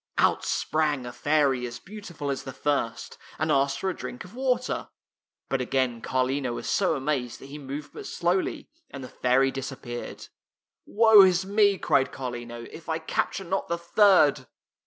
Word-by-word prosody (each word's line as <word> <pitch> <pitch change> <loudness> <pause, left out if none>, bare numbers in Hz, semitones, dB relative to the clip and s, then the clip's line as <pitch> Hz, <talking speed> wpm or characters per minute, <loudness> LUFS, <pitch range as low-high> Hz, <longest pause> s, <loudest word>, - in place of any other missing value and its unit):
Out - - +3
sprang 150 -4 0
a 120 - -7
fairy 140 -4 +1
as 120 - -7
beautiful 175 -8 -6
as 135 - -3
the 135 - -7
fii'st, 130 -4 -2 0.2
and 155 0 0
asked 140 -1 +2
for - - -2
a 185 - -1
drink 245 -4 -7
of 185 - -14
water. 250 -1 -1 0.6
But 135 -1 -1
again 125 -2 0
Carlino 130 0 -1
was - - -6
so 185 -5 +2
amazed 135 -3 -2
that - - -12
he 145 +2 -8
moved 145 +2 -7
but - - -8
slowly, 175 +2 -1 0.2
and 140 - -8
the 130 - -8
fairy 130 +2 +2
disappeared. 130 -3 -7 0.3
" - - -65
Woe 220 -1 +7
is 185 -1 +4
me," 200 0 +3
cried 135 -5 +2
Carlino, 120 -2 -6
" - - -12
if 165 0 -11
I 160 - 0
cap 160 - -1
ture 195 - -5
not 190 +3 -2
the 170 - -1
third! 170 - +4
145 Hz, 180 wpm, -26 LUFS, 130-185 Hz, 0.6 s, Woe